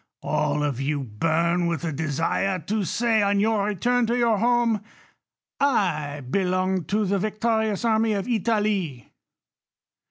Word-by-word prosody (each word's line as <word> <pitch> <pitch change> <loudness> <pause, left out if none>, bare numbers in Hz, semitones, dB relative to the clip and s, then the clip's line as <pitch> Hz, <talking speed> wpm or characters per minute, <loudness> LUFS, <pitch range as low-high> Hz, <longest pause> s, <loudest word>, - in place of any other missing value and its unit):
All 150 0 0
of 140 -3 -2
you 140 0 -1
burn 165 +9 0
with 170 0 -2
a 165 - -1
desire 160 +6 -1
to 200 +5 -2
say 225 +4 +1
on 200 0 +2
your 210 -1 +1
return 235 +4 +1
to 240 +2 0
your 230 -4 +2
home, 235 -1 +2 0.8
I 155 - 0
belonged 185 +1 0
to 210 +4 +1
the 200 +1 0
victorious 220 +1 -1
army 220 -1 +2
of 200 +1 -2
Italy. 210 - -1
200 Hz, 135 wpm, -24 LUFS, 160-220 Hz, 0.8 s, on